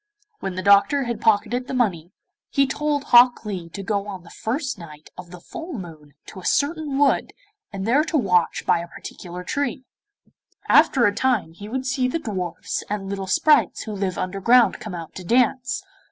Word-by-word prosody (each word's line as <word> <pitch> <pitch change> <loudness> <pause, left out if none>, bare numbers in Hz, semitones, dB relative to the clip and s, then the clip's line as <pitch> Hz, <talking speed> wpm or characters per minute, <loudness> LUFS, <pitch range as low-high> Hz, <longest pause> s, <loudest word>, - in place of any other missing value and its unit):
When 190 -2 -4
the 185 - -4
Doctor 200 +8 +5
had 235 -2 -4
pocketed 225 +4 +1
the 265 - -4
money, 180 -9 0 0.4
he 275 -1 +3
told 290 +1 -1
Hok 245 -3 +5
Lee 185 -5 -5
to 195 +4 -7
go 200 0 -2
on 190 -3 -7
the 170 - -15
first 260 - -3
night 155 -3 -12
of 180 -1 -10
the 180 0 -11
full 325 - -8
moon 155 -6 -10
to 195 - -10
a - - -12
certain 290 -1 0
wood 285 -1 +2 0.4
and 195 -2 -5
there 265 +7 +3
to 325 - 0
watch 180 - +1
by - - +3
a 170 - -6
particular 180 +1 -9
tree. 270 +4 -2 0.8
After 245 -4 +5
a 205 - +3
time 235 -9 0
he 205 +5 -10
would 260 +2 -3
see 260 -1 0
the 255 - -1
dwarfs 190 - -4
and 200 -2 -3
little 195 -1 -4
sprites 300 +10 +3
who 220 - -6
live 195 -3 -3
underground 195 +4 +3
come 210 -4 -7
out 165 -2 -8
to 185 - -8
dance. 250 - +1
210 Hz, 190 wpm, -23 LUFS, 185-260 Hz, 0.8 s, Doctor